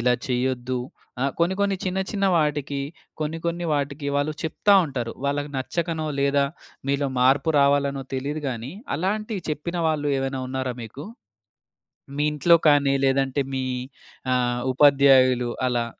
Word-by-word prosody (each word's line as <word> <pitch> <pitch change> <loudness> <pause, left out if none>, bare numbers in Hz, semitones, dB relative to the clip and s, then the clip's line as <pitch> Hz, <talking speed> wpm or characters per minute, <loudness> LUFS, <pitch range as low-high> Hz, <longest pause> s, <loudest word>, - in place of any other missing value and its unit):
ఇలా 125 +1 +3
చేయొద్దు," 125 0 -1 0.4
ఆహ్, 140 - +1
కొన్ని 170 +3 +2
కొన్ని 200 -1 +1
చిన్న 185 0 -1
చిన్న 200 -2 0
వాటికి, 145 -2 0 0.4
కొన్ని 155 +1 -2
కొన్ని 170 +1 -2
వాటికి 140 0 -3
వాళ్ళు 145 +2 0
చెప్తా 200 +5 +3
ఉంటారు. 120 -4 -4
వాళ్ళకి 145 +1 -1
నచ్చకనో 160 +3 -2
లేదా, 140 0 +3 0.4
మీలో 140 0 +1
మార్పు 135 +5 +3
రావాలనో 140 -1 +2
తెలీదు 145 +4 -3
గానీ, 120 +2 -5 0.2
అలాంటివి 210 +2 -2
చెప్పిన 155 +4 -3
వాళ్ళు 150 -2 0
ఏమైనా 135 0 -2
ఉన్నారా 130 -1 -3
మీకు? 115 +6 -8 1.1
మీ 150 - +1
ఇంట్లో 170 +3 +5
కానీ, 145 -2 +4
లేదంటే 135 +1 +1
మీ 130 0 -1 0.7
ఆహ్, 125 -1 0
ఉపాధ్యాయులు 130 -3 +5 0.2
అలా. 120 -1 0
140 Hz, 135 wpm, -24 LUFS, 130-155 Hz, 1.1 s, ఇంట్లో